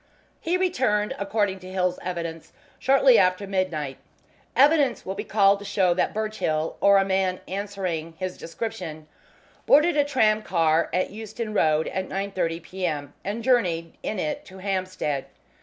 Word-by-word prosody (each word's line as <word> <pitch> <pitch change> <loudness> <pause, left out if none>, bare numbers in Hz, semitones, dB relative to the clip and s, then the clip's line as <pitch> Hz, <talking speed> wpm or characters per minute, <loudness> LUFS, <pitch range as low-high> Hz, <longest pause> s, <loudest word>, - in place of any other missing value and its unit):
He 345 +3 0
returned, 255 - +1
according 200 -1 0
to 185 0 -10
Hill's 180 -1 0
evidence, 170 -2 -5 0.3
shortly 265 -2 +5
after 185 +2 +2
midnight. 180 -8 -2 0.6
Evidence 280 -3 +4
will 190 - -3
be 205 +2 -5
called 200 -2 +3
to - - -9
show 190 -3 +2
that 180 - 0
Birchill, 215 -8 -2
or 200 0 +6
a 195 - +3
man 190 -1 0
answering 185 -5 -4
his 185 -1 -4
description, 165 -5 -6 0.6
boarded 300 +4 +5
a 290 - +4
tramcar 210 - +2
at 185 +2 0
Euston 220 +1 -6
Road 155 -5 +2
at 190 0 -3
9.30 190 -4 -2
p.m., 160 -6 -4
and 210 +4 -4
journeyed 175 -10 +1
in 215 - -3
it 155 -4 -2
to 190 - -13
Hampstead. 185 -7 -2
190 Hz, 145 wpm, -25 LUFS, 170-215 Hz, 0.6 s, or